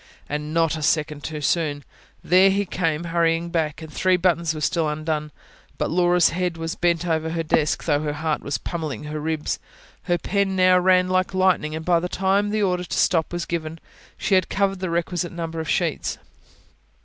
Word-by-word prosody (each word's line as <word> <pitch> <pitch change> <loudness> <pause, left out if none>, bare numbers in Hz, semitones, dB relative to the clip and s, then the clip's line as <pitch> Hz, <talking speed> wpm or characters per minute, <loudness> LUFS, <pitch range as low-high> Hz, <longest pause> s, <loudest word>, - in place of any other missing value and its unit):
And 150 +1 -4
not 165 0 +2
a 155 - -5
second 150 -1 0
too 155 -1 -5
soon. 145 -2 0 0.4
There 185 +2 +5
he 200 +1 +1
came, 165 -3 -1
hurrying 170 0 +1
back. 160 -2 -1
And 155 -1 -10
three 185 -1 +2
buttons 170 -3 +1
were 155 - -5
still 160 0 +1
undone. 150 0 -3 0.5
But - - -1
Laura's 175 0 +4
head 180 -1 -2
was 165 +1 -3
bent 175 -1 0
over 160 -1 0
her 165 0 -2
desk: 155 0 +1
though 145 -3 +2
her 150 -1 -2
heart 155 0 -2
was 140 - -2
pummelling 160 -4 -5
her 150 +1 -5
ribs, 155 0 -2 0.5
her 175 - +1
pen 195 +2 0
now 185 0 +5
ran 185 0 +4
like 185 +1 0
lightning; 185 -5 +2
and 160 0 -6
by 175 -2 +3
the 180 +1 -4
time 195 +3 +1
the 215 0 0
order 180 -2 0
to - - -4
stop 165 -3 +2
was 175 -1 -3
given, 165 -1 -4 0.4
she - - -1
had 185 -2 +3
covered 195 -1 0
the 185 -1 -3
requisite 175 0 -1
number 165 -1 -4
of 160 - -4
sheets. - - -1
170 Hz, 195 wpm, -23 LUFS, 155-180 Hz, 0.5 s, There